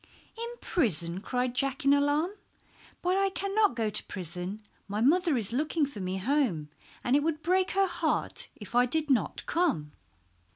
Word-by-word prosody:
"In 465 +1 -5
prison," 175 - 0
cried 250 +2 -1
Jack 275 +1 -1
in 280 - +6
alarm. 290 +5 +2 0.7
"But 365 +2 +2
I 390 0 +3
cannot 395 - +1
go 225 -2 0
to - - +1
prison. 180 +3 -5 0.2
My 205 +1 -3
mother 320 +4 +3
is 225 -1 0
looking 305 +3 +1
for 280 -7 -8
me 185 0 -2
home, 200 - 0 0.3
and 245 - +2
it 290 - +4
would 315 0 -1
break 370 +3 +2
her 390 0 +4
heart 365 - -1
if 210 +1 -11
I 245 +1 +4
did 305 +2 0
not 255 - +1
come." 295 - 0
275 Hz, 170 wpm, -29 LUFS, 210-335 Hz, 0.7 s, in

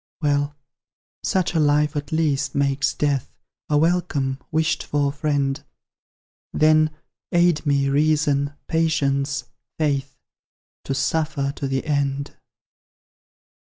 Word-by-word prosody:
Well, 145 -1 0 0.7
such 185 -2 0
a 165 - +2
life 150 0 +3
at 145 +3 -4
least 150 -3 0
makes 140 0 +1
Death 145 -3 -1 0.3
A 150 - +3
welcome, 150 -5 +1
wished 160 +1 +1
for 145 -1 0
friend; 140 -2 -1 0.9
Then, 155 0 +4 0.4
aid 175 -2 +3
me, 140 -1 +2
Reason, 145 0 +2
Patience, 140 -5 0 0.3
Faith, 140 -3 -1 0.7
To 135 - -2
suffer 140 -1 0
to 140 - -3
the 135 0 -2
end! 140 -2 -1
145 Hz, 105 wpm, -23 LUFS, 140-155 Hz, 0.9 s, Then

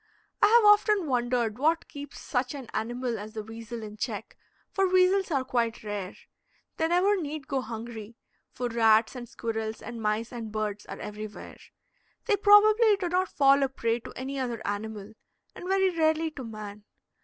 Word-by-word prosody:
I - - +7
have 455 +1 +6
often 415 -2 +5
wondered 245 -4 0
what 320 +4 +1
keeps 285 -1 -9
such 250 +1 -2
an 265 -4 -8
animal 240 0 -2
as 215 +1 -8
the 215 -2 -5
weasel 225 +1 -8
in 210 0 -9
check, - - -4 0.4
for 390 0 +2
weasels 370 +1 +4
are 275 -5 +1
quite 235 -3 -1
rare. 205 -3 -5 0.6
They 320 - +1
never 370 +3 +2
need 295 -2 -5
go 270 -2 -1
hungry, 225 -1 -8 0.3
for 245 - -3
rats 225 0 +3
and 240 -2 -7
squirrels 225 -1 -4
and 235 0 -8
mice 215 +2 -1
and 230 -3 -6
birds 210 -1 -3
are - - -7
everywhere. 210 0 -8 0.7
They 425 - +3
probably 420 +2 +6
do 360 -3 -2
not 365 +1 +1
fall 275 0 +4
a 270 - +2
prey 230 -3 -1
to - - -10
any 270 +2 -4
other 240 -4 -3
animal, 210 0 -4 0.4
and 360 - -9
very 385 -1 +3
rarely 320 0 +2
to 285 -4 -8
man. 210 -2 -8
245 Hz, 175 wpm, -28 LUFS, 220-325 Hz, 0.7 s, I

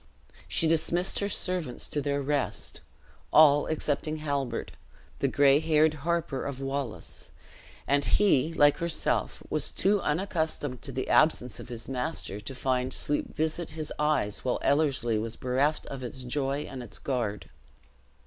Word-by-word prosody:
She 165 - +2
dismissed 170 +3 +1
her 200 - -1
servants 180 -10 -2
to 145 - -1
their 140 0 -1
rest; 145 -1 -2 0.5
all, 145 -1 +6
excepting 155 0 -1
Halbert, 140 -6 -2 0.5
the - - +2
gray 140 0 +5
haired 155 -1 +3
harper 155 -2 -2
of 140 -2 -4
Wallace; 135 - -4 0.6
and 140 0 +2
he, 165 -7 +3
like 145 -3 +4
herself, 170 -1 0
was - - +1
too 200 0 +2
unaccustomed 155 - -1
to 135 - -7
the 130 0 -3
absence 150 -5 +3
of - - -9
his 115 -2 -7
master 125 -5 -3
to 130 +6 -7
find 130 0 0
sleep 145 - -2
visit 160 +2 -1
his 155 -1 -4
eyes 150 -9 +1
while 125 - -1
Ellerslie 135 -6 +2
was 115 +1 -3
bereft 135 +5 0
of 135 -2 -7
its 125 +1 -6
joy 135 +2 -1
and 135 -2 -7
its 120 - -8
guard. 115 -6 -3
140 Hz, 150 wpm, -28 LUFS, 130-155 Hz, 0.6 s, all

